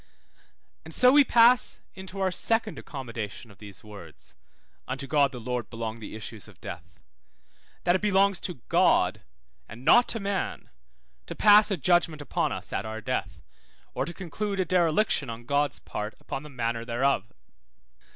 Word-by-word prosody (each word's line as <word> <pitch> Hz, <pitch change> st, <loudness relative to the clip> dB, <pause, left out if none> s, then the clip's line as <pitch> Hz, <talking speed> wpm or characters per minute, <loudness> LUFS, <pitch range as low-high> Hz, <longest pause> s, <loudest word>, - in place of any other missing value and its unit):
And -, -, -7 dB
so 250 Hz, 0 st, +6 dB
we 290 Hz, +1 st, +7 dB
pass 240 Hz, -1 st, +4 dB, 0.2 s
unto 190 Hz, 0 st, -9 dB
our 190 Hz, -1 st, +1 dB
second 225 Hz, +3 st, +1 dB
accommodation 115 Hz, -5 st, -7 dB
of 100 Hz, -, -19 dB
these 100 Hz, -3 st, -12 dB
words 100 Hz, -7 st, -13 dB, 0.5 s
(unto 140 Hz, +1 st, -4 dB
God 140 Hz, -1 st, +2 dB
the 125 Hz, -, -8 dB
Lord 120 Hz, -1 st, -4 dB
belong 115 Hz, -1 st, -5 dB
the 110 Hz, -, -8 dB
issues 110 Hz, -6 st, -7 dB
of -, -, -17 dB
death); -, -, -7 dB, 1.0 s
that 175 Hz, -, +3 dB
it 185 Hz, -, 0 dB
belongs 200 Hz, -2 st, +3 dB
to 175 Hz, -10 st, -5 dB
God, -, -, +3 dB, 0.5 s
and 120 Hz, +5 st, -11 dB
not 240 Hz, 0 st, +6 dB
to 225 Hz, -, +1 dB
man, 200 Hz, -1 st, -3 dB, 0.6 s
to -, -, -6 dB
pass 210 Hz, 0 st, +6 dB
a 195 Hz, -, 0 dB
judgment 170 Hz, 0 st, +2 dB
upon 145 Hz, -, -1 dB
us -, -, -6 dB
at -, -, -1 dB
our 110 Hz, 0 st, -6 dB
death, 110 Hz, -, -4 dB, 0.5 s
or -, -, -1 dB
to 170 Hz, -, -7 dB
conclude 195 Hz, +3 st, -4 dB
a 185 Hz, -, +2 dB
dereliction 170 Hz, -, +1 dB
on 115 Hz, +1 st, -8 dB
God's 145 Hz, +2 st, 0 dB
part 105 Hz, +1 st, -6 dB
upon 135 Hz, -, -6 dB
the 150 Hz, -, -11 dB
manner 115 Hz, -3 st, -3 dB
thereof. 120 Hz, -1 st, 0 dB
145 Hz, 165 wpm, -27 LUFS, 115-195 Hz, 1.0 s, we